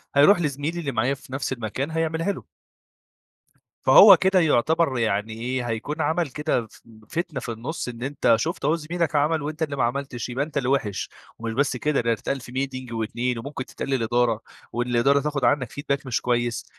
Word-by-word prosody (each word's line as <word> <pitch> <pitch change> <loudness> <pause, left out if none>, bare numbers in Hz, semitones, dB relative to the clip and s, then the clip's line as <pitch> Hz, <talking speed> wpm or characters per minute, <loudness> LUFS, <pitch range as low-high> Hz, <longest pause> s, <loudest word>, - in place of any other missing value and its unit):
هيروح 175 +7 +6
لزميلي 150 +3 -2
اللي 140 -4 -2
معايا 125 +4 +1
في 135 -1 -11
نفس 135 0 -2
المكان 130 +5 -4
هيعملها 165 +3 0
له. - - -7 1.4
فهو 200 -3 +10
كده 190 +1 +3
يعتبر 160 -1 +2
يعني 110 -1 0
إيه 120 +2 -3
هيكون 145 +8 -3
عمل 160 0 0
كده 150 -5 -1
ف - - -19 0.3
فتنة 170 -4 -3
في 120 - -4
النص، 125 +5 -5
إن 120 0 -7
أنت 135 -4 +2
شُفت 165 +8 -3
أهو 150 +3 +3
زميلك 165 -1 -2
عمله، 150 +1 +1
وأنت 155 +2 -4
اللي 145 -3 -1
ما 130 - +1
عملتش، 130 0 -3
يبقى 130 +3 -1
أنت 155 0 -13
اللي 125 -2 -1
وحش، 115 -8 0 0.3
ومش 115 0 -4
بس 135 0 +1
كده 150 +2 +1
ده 115 0 +1
هتتقال 135 +5 -2
في 125 - -11
meeting 130 -2 -4
و2. 115 +2 -2
وممكن 130 +2 -5
تتقال - - -7
للإدارة، 120 -2 +1 0.3
والإدارة 120 +3 +2
تاخد 145 -2 -2
عنك 135 -5 +2
feedback 140 -1 -3
مش 125 - 0
كويس، 120 -1 -1
135 Hz, 185 wpm, -24 LUFS, 120-150 Hz, 1.4 s, فهو